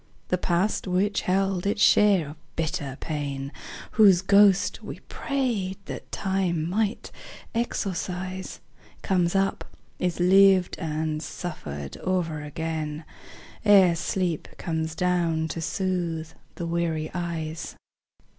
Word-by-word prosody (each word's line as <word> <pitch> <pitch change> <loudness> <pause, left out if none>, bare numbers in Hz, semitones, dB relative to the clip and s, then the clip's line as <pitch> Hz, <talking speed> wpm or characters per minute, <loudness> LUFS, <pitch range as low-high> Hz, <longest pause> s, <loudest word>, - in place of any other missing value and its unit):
The 180 - +2
past 180 +4 0
which 195 +3 +1
held 195 0 +1
its 205 +1 0
share 200 -8 +5
of 150 - -10 0.2
bitter 145 -4 -2
pain, 140 -3 -4 0.4
Whose 195 -5 +6
ghost 200 -1 +4
we - - -8
prayed 235 -9 -1
that - - -8
Time 185 -4 0
might 210 +4 -1 0.4
exorcise, 185 -4 -3 0.4
Comes 180 -2 +1
up, 195 0 +1 0.4
is 180 -1 -1
lived 190 0 +5
and 155 -1 -2
suffered 75 - -6
o'er 170 -5 -1
again, 155 0 -4 0.6
Ere 195 -5 +6
sleep 175 -1 -1
comes 160 -1 -3
down 170 -2 +1
to 165 - -4
soothe 170 -3 -2 0.3
the 170 - -4
weary 165 -2 -1
eyes. 165 -3 -4
175 Hz, 110 wpm, -26 LUFS, 160-190 Hz, 0.6 s, Whose